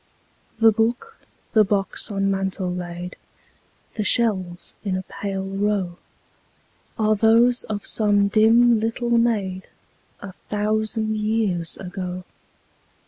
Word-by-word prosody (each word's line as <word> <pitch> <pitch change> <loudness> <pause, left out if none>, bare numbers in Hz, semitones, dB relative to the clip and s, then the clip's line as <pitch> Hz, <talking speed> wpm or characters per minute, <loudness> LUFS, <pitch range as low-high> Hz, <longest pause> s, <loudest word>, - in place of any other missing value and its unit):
The 225 0 +6
book, 235 - -1 0.3
the 215 - +6
box 195 +2 -2
on 195 -1 0
mantel 190 -1 -2
laid, 175 0 -6 0.8
The 215 - -2
shells 190 -6 0
in 190 -3 -1
a 185 - -4
pale 195 0 -5
row, 195 -2 -1 1.0
Are 215 -1 +2
those 230 +3 +4
of 205 -2 -5
some 205 -2 +3
dim 225 +2 +5
little 230 +2 -2
maid, 210 -6 +1 0.5
A 200 - -8 0.2
thousand 215 +1 -1
years 210 -6 -1
ago. 180 -1 -6
205 Hz, 110 wpm, -23 LUFS, 190-225 Hz, 1.0 s, The